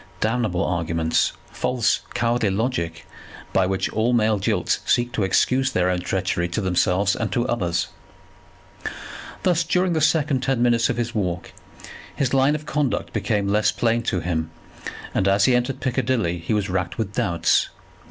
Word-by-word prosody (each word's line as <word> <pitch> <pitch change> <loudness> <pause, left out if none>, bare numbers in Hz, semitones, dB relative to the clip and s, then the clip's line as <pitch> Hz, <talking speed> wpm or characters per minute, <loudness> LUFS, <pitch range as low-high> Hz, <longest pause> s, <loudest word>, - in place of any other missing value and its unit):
Damnable 110 -4 0
arguments! 85 -2 0 0.2
False, 125 -3 0
cowardly 115 -2 +1
logic, 95 -5 -2 0.5
by 95 -1 +3
which 95 0 0
all 115 +3 +1
male 110 -3 +2
jilts 95 - 0
seek 120 0 +1
to 110 - -2
excuse 130 +7 +2
their 90 -5 +1
own 90 - 0
treachery 90 -1 -1
to 85 - -3
themselves 95 +1 +2
and 110 - -2
to 120 +1 0
others! 85 -8 -1 1.5
Thus 175 -2 +3
during 180 +2 +1
the 160 - 0
second 150 -3 +2
ten 135 -1 0
minutes 120 -1 +3
of - - -1
his 120 0 -2
walk, 90 -4 -3 0.6
his 135 -2 0
line 135 +2 +4
of 155 0 -6
conduct 150 -3 -1
became 105 -3 0
less 105 +1 +2
plain 115 0 +1
to 90 - -1
him, 80 -2 -2 0.6
and 95 - +1
as 100 0 +4
he 125 - +4
entered 125 +2 -1
Piccadilly 120 -9 0
he 85 +6 -1
was 100 -2 0
racked 90 -1 -2
with 105 -2 -3
doubts. 85 -4 +1
110 Hz, 160 wpm, -23 LUFS, 90-125 Hz, 1.5 s, line